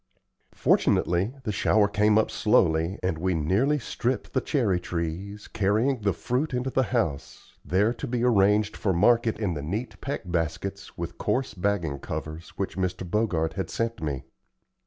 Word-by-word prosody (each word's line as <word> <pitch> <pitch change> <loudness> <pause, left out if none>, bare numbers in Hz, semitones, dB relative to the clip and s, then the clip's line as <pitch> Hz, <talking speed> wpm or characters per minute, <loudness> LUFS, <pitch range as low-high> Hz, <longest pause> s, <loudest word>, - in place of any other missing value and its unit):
Fortunately, 95 +9 +2
the 110 - -1
shower 105 +1 +3
came 105 +1 +3
up 110 - +2
slowly, 85 -3 +2
and 85 -4 -1
we 90 +1 0
nearly 100 - +2
stripped 125 -1 -3
the 130 - +2
cherry 110 - +1
trees, 90 +4 -4
carrying 110 +6 +1
the 100 -1 +2
fruit 125 - -1
into 125 +2 -1
the 130 - +2
house, 95 - -2
there 105 +6 +2
to 115 - -6
be 120 0 -1
arranged 105 -2 +3
for 95 -3 0
market 115 +5 +3
in 100 -5 0
the 75 - -4
neat 100 - -4
peck 140 - -3
baskets 90 +3 -3
with 85 -1 -6
coarse 125 +2 0
bagging 90 -7 -1
covers 80 +4 -6
which 95 -1 -3
Mr. 95 -1 -2
Bogart 85 -5 0
had 95 - -3
sent 115 0 -2
me. 70 -4 -3
100 Hz, 160 wpm, -26 LUFS, 85-115 Hz, -, shower